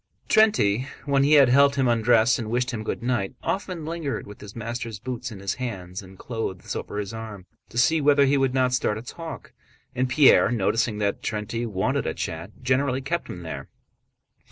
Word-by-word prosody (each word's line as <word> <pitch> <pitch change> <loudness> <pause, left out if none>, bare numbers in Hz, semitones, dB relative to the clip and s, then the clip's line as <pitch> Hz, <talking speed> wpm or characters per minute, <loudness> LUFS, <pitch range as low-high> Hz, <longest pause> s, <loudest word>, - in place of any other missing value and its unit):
Terénty, 135 - +3 0.2
when 140 -1 +3
he 145 +2 +4
had 140 -4 +7
helped 140 +2 +5
him 135 -2 +2
undress 115 0 +3
and 110 -2 -4
wished 125 +2 0
him 110 -3 -4
good 110 - -4
night, 120 -6 -1
often 185 -4 -3
lingered 160 -3 -3
with 105 - -12
his 105 -1 -10
master's 115 -1 -5
boots 125 +1 -5
in 105 - -9
his 100 0 -2
hands 95 -6 -5
and 95 0 -14
clothes 110 -6 -5
over - - -5
his 105 0 -4
arm, 110 -4 -8 0.2
to 120 - -9
see 140 +6 +3
whether 145 -1 +5
he 140 +1 +3
would 135 -2 +1
not 130 -1 +2
start 105 -4 +1
a 110 - -7
talk. 165 +6 -8 0.4
And 130 +1 0
Pierre, 135 +2 +6
noticing 115 0 0
that 100 -1 -1
Terénty 115 +2 -3
wanted 95 -3 -1
a - - -2
chat, 80 +3 -4
generally 130 +1 +1
kept 170 +5 -2
him 90 - -7
there. 80 - -7
120 Hz, 195 wpm, -25 LUFS, 105-135 Hz, 0.4 s, had